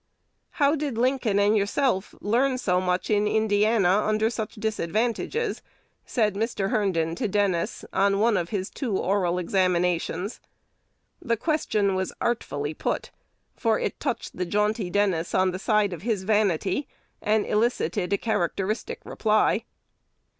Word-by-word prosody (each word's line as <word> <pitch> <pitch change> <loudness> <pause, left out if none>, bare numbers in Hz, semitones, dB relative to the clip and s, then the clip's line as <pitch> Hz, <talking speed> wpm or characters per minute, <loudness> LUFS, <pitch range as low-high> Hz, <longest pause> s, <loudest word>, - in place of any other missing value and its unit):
"How 290 0 +3
did 285 -6 -3
Lincoln 250 -4 +1
and 205 +1 +4
yourself 205 0 0
learn 255 +5 +2
so 185 -7 +1
much 180 +2 -1
in 210 0 +3
Indiana 210 -2 +3
under 215 +1 +1
such 220 -3 -4
disadvantages?" 220 - -1 0.5
said 215 -5 +1
Mr. 205 -1 -1
Herndon 165 -6 +1
to 215 +7 -2
Dennis, 195 -4 0
on 195 +1 +3
one 220 +2 +3
of 175 -3 -1
his 195 -3 -3
two 230 -9 -2
oral 185 -2 +1
examinations. 180 0 0 0.8
The 230 -1 0
question 220 - 0
was 190 0 -2
artfully 150 -11 -2
put; - - -3 0.4
for - - +1
it - - -3
touched - - -3
the 180 - -2
jaunty 210 0 0
Dennis 185 -4 0
on 185 0 +3
the 185 - -5
side 210 -2 +2
of 170 - -7
his 210 -3 -1
vanity, 205 - +1 0.3
and 215 0 +2
elicited 205 -5 0
a 200 - +3
characteristic 215 - -2
reply. 215 -1 +1
205 Hz, 140 wpm, -25 LUFS, 185-225 Hz, 0.8 s, and